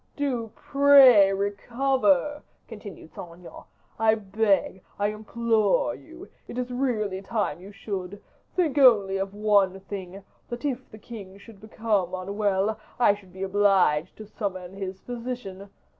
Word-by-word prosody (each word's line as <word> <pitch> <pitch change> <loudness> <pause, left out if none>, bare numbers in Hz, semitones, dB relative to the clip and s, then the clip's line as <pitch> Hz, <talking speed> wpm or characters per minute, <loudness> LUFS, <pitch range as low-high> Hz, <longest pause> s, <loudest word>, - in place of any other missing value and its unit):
"Do 250 -6 -2
pray 275 -8 +6
recover," 220 +5 0 0.3
continued 205 -7 -11
Saint 170 -2 -9
Aignan. 175 0 -13 0.3
"I 220 0 +4
beg, 200 -2 0 0.2
I 205 0 +1
implore 225 - 0
you; 335 +5 -13 0.2
it - - -8
is 250 0 -3
really 220 -7 -1
time 200 -6 -2
you 195 +2 -11
should; 200 -1 -6 0.4
think 315 -6 +1
only 205 -7 +5
of 195 +1 -4
one 200 -3 +2
thing, 195 -1 -8 0.3
that 240 +4 -6
if 260 -2 -3
the 215 - -12
king 200 -3 -10
should 200 0 -16
become 215 -4 -1
unwell, 200 +2 -1 0.2
I 235 -4 +5
should 200 -3 -14
be 190 +1 -7
obliged 190 -5 +2
to 215 - -9
summon 195 -4 -5
his 190 -1 -6
physician. 235 -5 -7
205 Hz, 140 wpm, -25 LUFS, 195-235 Hz, 0.4 s, pray